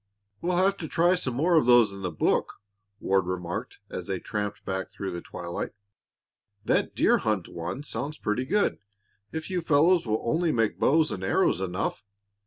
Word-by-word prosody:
"We'll 175 Hz, 0 st, 0 dB
have 195 Hz, +2 st, +3 dB
to 160 Hz, -, -5 dB
try 175 Hz, +4 st, +3 dB
some 135 Hz, -9 st, -1 dB
more 165 Hz, +5 st, +3 dB
of 145 Hz, -, +3 dB
those 120 Hz, -4 st, +6 dB
in 100 Hz, 0 st, -9 dB
the 90 Hz, -, -2 dB
book," -, -, 0 dB, 0.5 s
Ward 95 Hz, -2 st, +1 dB
remarked 90 Hz, +5 st, -4 dB
as 90 Hz, -, -5 dB
they 95 Hz, -1 st, -1 dB
tramped 105 Hz, +2 st, -4 dB
back 95 Hz, 0 st, -3 dB
through 95 Hz, -1 st, -5 dB
the 85 Hz, -1 st, -5 dB
twilight. 85 Hz, 0 st, -5 dB, 0.9 s
"That -, -, +1 dB
deer -, -, +4 dB
hunt 105 Hz, -5 st, -1 dB
one 85 Hz, +11 st, -5 dB
sounds 150 Hz, +1 st, -3 dB
pretty 105 Hz, +5 st, -1 dB
good, 205 Hz, +8 st, +1 dB, 0.5 s
if 160 Hz, +2 st, -5 dB
you 180 Hz, -1 st, 0 dB
fellows 165 Hz, 0 st, +3 dB
will 110 Hz, 0 st, 0 dB
only 160 Hz, +6 st, +1 dB
make 115 Hz, -4 st, 0 dB
bows 155 Hz, +1 st, +3 dB
and 95 Hz, -, -4 dB
arrows 95 Hz, 0 st, +2 dB
enough. 95 Hz, +2 st, -2 dB
115 Hz, 180 wpm, -27 LUFS, 95-160 Hz, 0.9 s, those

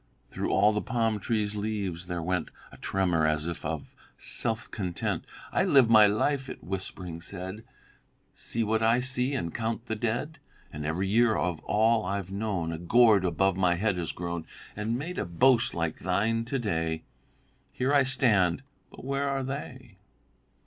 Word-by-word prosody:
"'Through -, -, -2 dB
all 105 Hz, +2 st, +4 dB
the 105 Hz, 0 st, -1 dB
palm 115 Hz, -3 st, 0 dB
tree's 105 Hz, 0 st, -1 dB
leaves 100 Hz, -5 st, -3 dB
there 90 Hz, -2 st, -3 dB
went 90 Hz, -1 st, -1 dB, 0.2 s
A -, -, -13 dB
tremor 90 Hz, -5 st, +1 dB
as 75 Hz, 0 st, 0 dB
of 80 Hz, -2 st, -4 dB, 0.2 s
self 115 Hz, -1 st, -2 dB
content. 90 Hz, -5 st, -3 dB, 0.3 s
"I -, -, +2 dB
live 130 Hz, -5 st, +5 dB
my 110 Hz, -2 st, +8 dB
life," 135 Hz, +6 st, 0 dB
it -, -, -8 dB
whispering 90 Hz, -2 st, -5 dB
said, 95 Hz, +4 st, -7 dB, 0.7 s
"See 115 Hz, -, -3 dB
what 110 Hz, +1 st, +1 dB
I 115 Hz, +2 st, +4 dB
see, 130 Hz, +1 st, 0 dB
and 85 Hz, -11 st, -3 dB
count 115 Hz, 0 st, -3 dB
the 110 Hz, -, -2 dB
dead; 120 Hz, +8 st, -2 dB, 0.3 s
And 75 Hz, 0 st, -4 dB
every 90 Hz, +5 st, -1 dB
year 115 Hz, +2 st, +4 dB
of 90 Hz, -4 st, -1 dB
all 110 Hz, +1 st, +3 dB
I've 95 Hz, 0 st, -3 dB
known 100 Hz, -5 st, -2 dB
A 80 Hz, -, -5 dB
gourd 110 Hz, +2 st, +5 dB
above 95 Hz, +2 st, +2 dB
my 90 Hz, -2 st, +3 dB
head 100 Hz, +1 st, 0 dB
has 85 Hz, -2 st, -2 dB
grown 85 Hz, -2 st, -5 dB, 0.3 s
And 110 Hz, +3 st, -1 dB
made 165 Hz, +7 st, -4 dB
a -, -, -1 dB
boast 120 Hz, +8 st, +3 dB
like 85 Hz, -2 st, -1 dB
thine 110 Hz, +5 st, 0 dB
to 135 Hz, +3 st, -2 dB
day, 80 Hz, -9 st, -1 dB
Yet 80 Hz, 0 st, -4 dB, 0.7 s
here 130 Hz, +3 st, 0 dB
I 140 Hz, -, +6 dB
stand; 125 Hz, -6 st, +2 dB, 0.3 s
but -, -, -12 dB
where 140 Hz, +1 st, 0 dB
are 135 Hz, -1 st, -1 dB
they?"'" 130 Hz, -5 st, -7 dB
105 Hz, 170 wpm, -28 LUFS, 90-120 Hz, 0.7 s, my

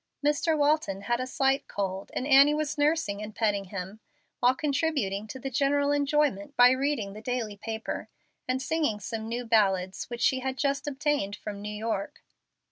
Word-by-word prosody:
Mr. 300 Hz, +2 st, +2 dB
Walton 290 Hz, -10 st, +1 dB
had 240 Hz, +4 st, 0 dB
a 255 Hz, -, -2 dB
slight 270 Hz, +1 st, +1 dB
cold, 195 Hz, -1 st, -3 dB
and 255 Hz, -, -1 dB
Annie 280 Hz, +1 st, +6 dB
was 300 Hz, -1 st, -1 dB
nursing 290 Hz, -9 st, +1 dB
and 215 Hz, 0 st, -7 dB
petting 205 Hz, -3 st, 0 dB
him, 190 Hz, +2 st, -7 dB, 0.4 s
while 250 Hz, +1 st, +4 dB
contributing 275 Hz, -9 st, -1 dB
to 260 Hz, -, -7 dB
the 270 Hz, +1 st, -5 dB
general 285 Hz, +2 st, +2 dB
enjoyment 290 Hz, -7 st, +1 dB
by 245 Hz, 0 st, +8 dB
reading 260 Hz, -6 st, -1 dB
the 215 Hz, -, -9 dB
daily 230 Hz, -3 st, -3 dB
paper 220 Hz, +2 st, -5 dB, 0.4 s
and 255 Hz, +1 st, -1 dB
singing 305 Hz, -10 st, 0 dB
some 220 Hz, +2 st, -5 dB
new 240 Hz, +1 st, -3 dB
ballads 195 Hz, -5 st, +2 dB
which 240 Hz, -1 st, -6 dB
she 260 Hz, -, +3 dB
had 265 Hz, 0 st, -3 dB
just 280 Hz, +2 st, 0 dB
obtained 285 Hz, -7 st, -1 dB
from 205 Hz, -1 st, -7 dB
New 210 Hz, -, -5 dB
York. 210 Hz, -1 st, -4 dB
245 Hz, 175 wpm, -28 LUFS, 210-285 Hz, 0.4 s, by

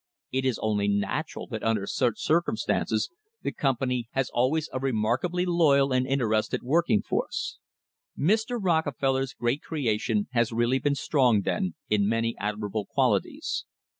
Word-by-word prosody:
It 130 Hz, 0 st, -1 dB
is 130 Hz, -4 st, +1 dB
only 105 Hz, -2 st, +1 dB
natural 100 Hz, +10 st, -1 dB
that 110 Hz, -4 st, -4 dB
under 110 Hz, -3 st, 0 dB
such 120 Hz, +2 st, 0 dB
circumstances 175 Hz, -, 0 dB, 0.3 s
the -, -, -1 dB
company 125 Hz, -3 st, -1 dB
has 135 Hz, -1 st, 0 dB
always 145 Hz, +6 st, +1 dB
a 130 Hz, -, -1 dB
remarkably 130 Hz, +8 st, 0 dB
loyal 145 Hz, -6 st, +3 dB
and 130 Hz, 0 st, +2 dB
interested 115 Hz, -5 st, 0 dB
working 170 Hz, -, +2 dB
force. 290 Hz, -, -2 dB, 0.6 s
Mr. 220 Hz, -, +1 dB
Rockefeller's 140 Hz, -, 0 dB
great 120 Hz, +5 st, -1 dB
creation 145 Hz, -, -1 dB
has 120 Hz, -2 st, +1 dB
really 120 Hz, +3 st, +2 dB
been 140 Hz, +2 st, +1 dB
strong, 125 Hz, -8 st, +2 dB
then,' 90 Hz, -2 st, -1 dB
in 105 Hz, -1 st, +2 dB
many 115 Hz, +1 st, 0 dB
admirable 105 Hz, 0 st, -3 dB
qualities. 285 Hz, -, 0 dB
130 Hz, 135 wpm, -27 LUFS, 115-160 Hz, 0.6 s, loyal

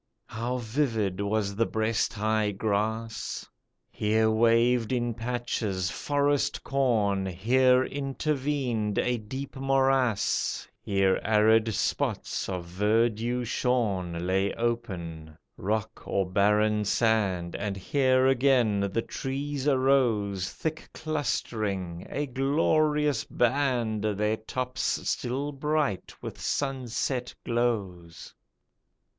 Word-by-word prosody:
How 120 Hz, +3 st, -3 dB
vivid 110 Hz, -6 st, -1 dB
was 100 Hz, -1 st, -1 dB
the 115 Hz, +2 st, +1 dB
breast 110 Hz, 0 st, 0 dB
high 110 Hz, 0 st, +1 dB
grass! 110 Hz, +2 st, -2 dB, 0.4 s
Here 110 Hz, +1 st, +2 dB
waved 115 Hz, +1 st, +3 dB
in 120 Hz, -2 st, 0 dB
patches, 115 Hz, -6 st, -2 dB
forest 145 Hz, -, 0 dB
corn, 110 Hz, -8 st, +1 dB
Here 125 Hz, +8 st, +3 dB
intervened 135 Hz, -6 st, -1 dB
a 125 Hz, 0 st, +1 dB
deep 130 Hz, +6 st, -7 dB
morass, 135 Hz, -4 st, +1 dB
Here 95 Hz, -1 st, +1 dB
arid 110 Hz, +1 st, +4 dB
spots -, -, -1 dB
of 90 Hz, -2 st, -3 dB
verdure 110 Hz, +6 st, +1 dB
shorn 100 Hz, -9 st, -1 dB
Lay 95 Hz, +2 st, +1 dB
open, 85 Hz, -10 st, -3 dB, 0.2 s
rock 110 Hz, +2 st, -3 dB
or 95 Hz, -2 st, 0 dB
barren 105 Hz, +2 st, +2 dB
sand, 100 Hz, -6 st, +1 dB
And 100 Hz, -1 st, -3 dB
here 130 Hz, +5 st, +2 dB
again 130 Hz, -5 st, +3 dB
the 115 Hz, +3 st, -1 dB
trees 140 Hz, +1 st, -4 dB
arose 120 Hz, -9 st, +2 dB
Thick 160 Hz, 0 st, -5 dB
clustering, 105 Hz, -, -2 dB
a 145 Hz, -, -2 dB
glorious 150 Hz, +1 st, +1 dB
band 120 Hz, -4 st, 0 dB
Their 105 Hz, +1 st, 0 dB
tops 125 Hz, +4 st, -2 dB
still 135 Hz, +4 st, -1 dB
bright 145 Hz, -, -1 dB
with -, -, -7 dB
sunset 130 Hz, -2 st, -2 dB
glows. 100 Hz, -8 st, -2 dB
115 Hz, 100 wpm, -27 LUFS, 100-130 Hz, 0.4 s, arid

